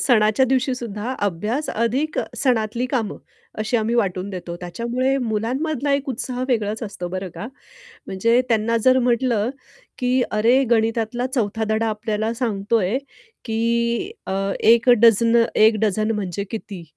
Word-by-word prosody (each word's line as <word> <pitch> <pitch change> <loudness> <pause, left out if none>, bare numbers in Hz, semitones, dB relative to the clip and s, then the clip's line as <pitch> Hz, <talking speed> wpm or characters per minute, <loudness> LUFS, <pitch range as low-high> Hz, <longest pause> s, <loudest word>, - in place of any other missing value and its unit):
सणाच्या 220 -1 +3
दिवशीसुद्धा 250 -3 -2
अभ्यास 210 - -2
अधिक 255 +7 -1 0.2
सणातली 240 -2 0
कामं 240 -6 -2 0.4
अशी 220 +3 0
आम्ही 225 +1 0
वाटून 195 -4 0
देतो 175 -2 -6
त्याच्यामुळे 235 +9 -1
मुलांमधला 260 +5 -1
एक 280 +1 -2
उत्साह 255 0 -3
वेगळाच 220 -3 -1
असतो 200 -5 -5
बरं 185 +1 -4
का. 225 - -6 0.6
म्हणजे 230 +6 +2
त्यांना 230 +1 +2
जर 255 0 +6
म्हटलं 240 -2 +1 0.5
की 250 0 +2
अरे 235 +6 +3
गणितातला 225 +1 +1
चौथा 225 -4 -1
धडा 220 +1 +1
आपल्याला 215 +1 -2
सांगतोय 220 -2 0 0.5
की 235 - 0 0.2
अ, - - -3 0.3
1 230 +2 +4
डझनं 230 0 +5
1 220 +1 +5
डझन 215 +1 +1
म्हणजे 200 -3 -3
किती? 205 -5 -6
230 Hz, 130 wpm, -21 LUFS, 210-250 Hz, 0.6 s, जर